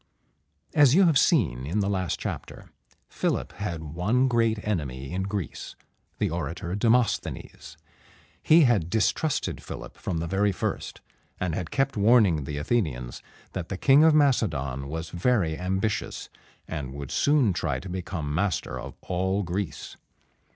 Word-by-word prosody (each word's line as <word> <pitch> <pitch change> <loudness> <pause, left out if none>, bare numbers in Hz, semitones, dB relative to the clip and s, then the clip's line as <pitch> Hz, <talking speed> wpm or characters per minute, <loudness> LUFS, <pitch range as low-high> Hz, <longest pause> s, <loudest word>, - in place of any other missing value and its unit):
As 145 -3 +6
you 190 +1 +6
have 160 -6 +4
seen 70 - +2
in 90 +8 -1
the 100 - +1
last 95 -4 -1
chapter, - - -6 0.4
Philip - - -2
had 85 -6 -4
one 90 - +1
great 115 -3 +2
enemy 70 -9 -3
in 90 +2 -2
Greece, 100 -2 -5 0.4
the - - 0
orator 85 +1 -4
Demosthenes. 115 +4 0 0.6
He 160 +2 +6
had 110 - +3
distrusted 115 - 0
Philip - - -8
from 85 - -3
the 80 - -2
very 100 +4 +1
first, 95 - -4 0.4
and 90 -3 -1
had 85 0 -3
kept 135 -1 0
warning 100 - +4
the 75 +1 -4
Athenians 75 - -2 0.3
that 90 -3 -5
the 95 - -3
King 135 +8 +6
of 160 -1 +6
Macedon 75 - +1
was 80 +3 -5
very 90 -4 +1
ambitious, 95 +3 -2 0.4
and 65 -3 -5
would 70 -2 -7
soon 140 -9 +3
try 75 -6 -1
to 70 - -9
become 90 -5 -4
master 85 -7 -1
of 65 +2 -8
all 95 +3 -1
Greece. 85 -4 -4
95 Hz, 145 wpm, -26 LUFS, 80-115 Hz, 0.6 s, As